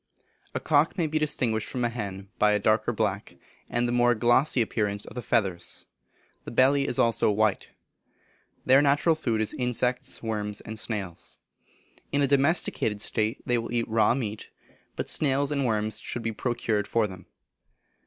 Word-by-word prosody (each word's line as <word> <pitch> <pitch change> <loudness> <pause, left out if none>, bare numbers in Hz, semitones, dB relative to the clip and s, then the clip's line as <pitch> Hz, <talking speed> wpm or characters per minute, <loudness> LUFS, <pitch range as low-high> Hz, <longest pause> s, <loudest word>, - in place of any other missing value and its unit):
A - - 0
cock 155 +4 +2
may 170 - +1
be 155 0 -1
distinguished 120 -7 0
from 125 -2 -2
a - - +1
hen 100 -4 -6
by 105 0 +4
a - - +3
darker 110 +1 +2
back, - - -2 0.3
and 120 0 0
the - - -1
more 120 0 +3
glossy 120 +5 +3
appearance 105 -3 -1
of - - -11
the 125 - -5
feathers. 95 -8 -1 0.6
The - - -7
belly 135 +3 +3
also 115 -2 +3
is 105 - -3
white. 110 -3 +1 1.0
Their 135 +2 +6
natural 145 +3 +3
food 120 -8 -1
is 110 - 0
insects, 125 0 -1
worms, 105 -2 -3
and 110 0 -6
snails. 100 -7 -5 0.7
In 145 0 +2
a - - +3
domesticated 140 - +1
state 110 +3 -1
they 120 -2 +1
will 115 - -6
eat 120 -1 -1
raw 115 +1 +3
meat, 110 -5 -5 0.5
but - - -4
snails 140 -1 +1
and 140 -3 0
worms 110 -1 0
should 120 - -5
be 115 - -1
procured 110 -3 -2
for 115 0 +1
them. 95 -3 -9
115 Hz, 170 wpm, -26 LUFS, 105-130 Hz, 1.0 s, Their